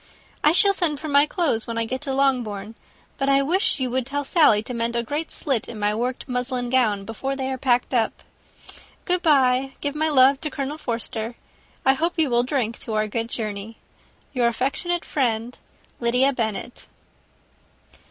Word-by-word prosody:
I 300 - +6
shall 395 +4 +4
send 325 -7 0
for 310 - -6
my 285 0 +5
clothes 300 - 0
when 230 -1 -4
I 230 - 0
get 260 +3 -4
to 285 -2 -3
Longbourn; 240 -7 0 0.5
but 275 0 +1
I 275 0 +4
wish 375 +6 +1
you 255 -2 -1
would 255 -1 -1
tell 285 +1 -2
Sally 275 - +4
to 250 - -6
mend 235 0 -1
a 235 - 0
great 295 +7 -3
slit 265 -7 0
in 235 - -7
my 210 0 +1
worked 245 +3 -3
muslin 250 -1 -2
gown 215 -6 +2
before 265 +5 -4
they 265 -1 -3
are 260 - -3
packed 250 0 +1
up. 230 -3 0 0.8
Good 360 -1 +1
bye. 270 -4 +3
Give 285 -1 -2
my 310 +1 0
love 270 -1 +5
to 310 - -2
Colonel 285 +2 -4
Forster. 230 -2 -4 0.5
I 265 - +6
hope 330 +6 -1
you 310 -5 +2
will 240 0 +4
drink 245 -3 -2
to 225 - -6
our 215 0 +1
good 230 +2 -3
journey. 215 -1 -5 0.6
"Your 245 -3 +2
affectionate 275 +9 -1
friend, 240 -3 -1 0.4
"LYDIA 250 +3 +2
BENNET." 225 0 -4
255 Hz, 180 wpm, -23 LUFS, 230-285 Hz, 0.8 s, I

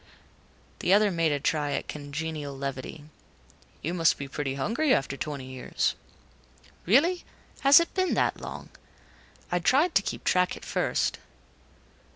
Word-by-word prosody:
The 185 - +2
other 205 0 +5
made 165 -3 +1
a 145 - 0
try 145 0 0
at - - -3
congenial 145 -1 -5
levity. 135 +2 -5 0.8
"You 170 - -2
must 165 -3 +3
be 140 - -6
pretty 135 -1 -3
hungry 230 - 0
after 135 0 -2
twenty 140 -2 -5
years." 130 -1 -2 0.9
"Really 330 - +4 0.4
has 275 +2 +8
it 335 - -2
been 370 -1 +1
that - - 0
long? - - -8 0.8
I 175 - +2
tried 285 - +3
to - - +4
keep - - -5
track 180 0 +2
at - - -12
first...." - - 0
160 Hz, 145 wpm, -27 LUFS, 140-215 Hz, 0.9 s, has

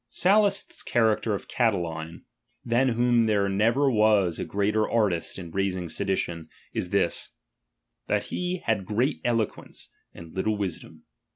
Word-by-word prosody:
Sallust's 200 - +2
character 110 -2 +1
of - - -8
CataUne, 85 -8 -1 0.4
than 125 +2 +2
whomEioTir 120 0 +3
"tliere 100 -2 +1
never 120 +7 +2
was 105 -6 +3
a - - -2
greater 105 +2 0
artist 105 -8 0
in 85 -3 -8
raising 95 -2 -2
sedi 95 +3 0
tions, 85 -2 -4 0.3
is - - -3
this: - - 0 0.7
thai - - +2
he 180 0 -3
had 110 -4 +1
great 120 +8 0
eloquence, 115 -3 -2 0.3
and''^ 85 -1 -12
little 105 +3 0
ivisdom. 85 -5 -5
105 Hz, 135 wpm, -26 LUFS, 95-120 Hz, 0.7 s, whomEioTir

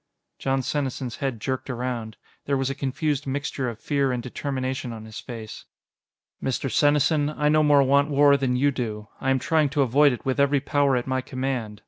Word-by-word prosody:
Jon 135 -1 0
Senesin's 130 -4 -3
head 135 -6 -3
jerked 130 +4 -3
around. 120 -3 -4 0.3
There 140 -1 +1
was 135 0 -1
a - - -2
confused 140 +1 -2
mixture 135 -1 -2
of 115 - -7
fear 140 -1 0
and 125 -1 -2
determination 130 -1 -3
on 110 -1 -9
his 110 -1 -8
face. 115 -3 -8 0.8
"Mr. 135 0 -1
Senesin, 145 0 +3
I 150 -1 0
no 155 +1 +4
more 145 -2 +5
want 140 +2 +3
war 145 0 +5
than 130 -2 0
you 140 +3 +3
do. 110 -5 -4
I 135 - -1
am 135 - +3
trying 155 +1 +2
to 140 +1 +2
avoid 140 +3 +4
it 125 - -6
with 130 +1 0
every 140 0 +3
power 140 0 +2
at 125 - -1
my 130 0 -1
command. 130 -5 -4
135 Hz, 195 wpm, -25 LUFS, 125-145 Hz, 0.8 s, more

